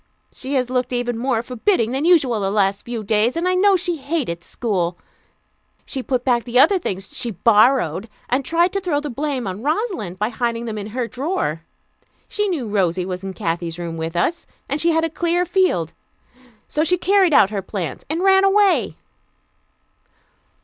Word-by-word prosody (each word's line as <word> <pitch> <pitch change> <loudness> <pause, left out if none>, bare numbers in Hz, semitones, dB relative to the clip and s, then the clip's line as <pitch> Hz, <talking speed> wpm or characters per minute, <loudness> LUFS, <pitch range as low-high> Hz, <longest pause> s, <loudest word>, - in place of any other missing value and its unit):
She 275 +2 -5
has 250 -1 0
looked 250 -1 0
even 245 -1 -1
more 235 -1 -1
forbidding 245 - 0
than 270 +4 -1
usual 285 -10 +4
the 195 -1 -1
last 200 -1 +1
few 235 -2 -5
days, 215 +6 +1
and 340 +2 0
I 365 - +2
know 390 +2 +4
she 350 -2 -1
hated 270 - -3
school. 180 -7 -2 0.9
She 265 - -4
put 250 -1 -2
back 240 -3 +2
the 245 0 -2
other 380 +9 +6
things 195 - -5
she 240 - -2
'borrowed,' 215 - +3 0.2
and 255 +3 0
tried 340 +5 +1
to 395 - 0
throw 340 -6 0
the 295 -1 -5
blame 275 -1 -2
on 190 +2 -5
Rosalind 305 - -2
by 210 +3 0
hiding 235 0 -2
them 215 -2 -4
in 205 - -6
her 240 +2 -3
drawer. 255 - -2 0.7
She 420 0 -1
knew 295 -11 -2
Rosy 185 -3 0
was 180 0 -5
in 190 -1 -6
Kathy's 165 0 -3
room 170 -1 -5
with 165 +1 -4
us, 325 - -1 0.2
and 290 +2 -2
she 340 - +3
had 325 0 +2
a - - +2
clear 345 +2 0
field. 355 - +1 0.7
So 300 - 0
she 360 +3 +2
carried 380 0 +3
out 200 - +5
her 200 -2 -2
plans, 180 -7 -5
and 330 +4 -1
ran 385 0 +5
away." 390 0 +3
245 Hz, 185 wpm, -20 LUFS, 200-330 Hz, 0.9 s, other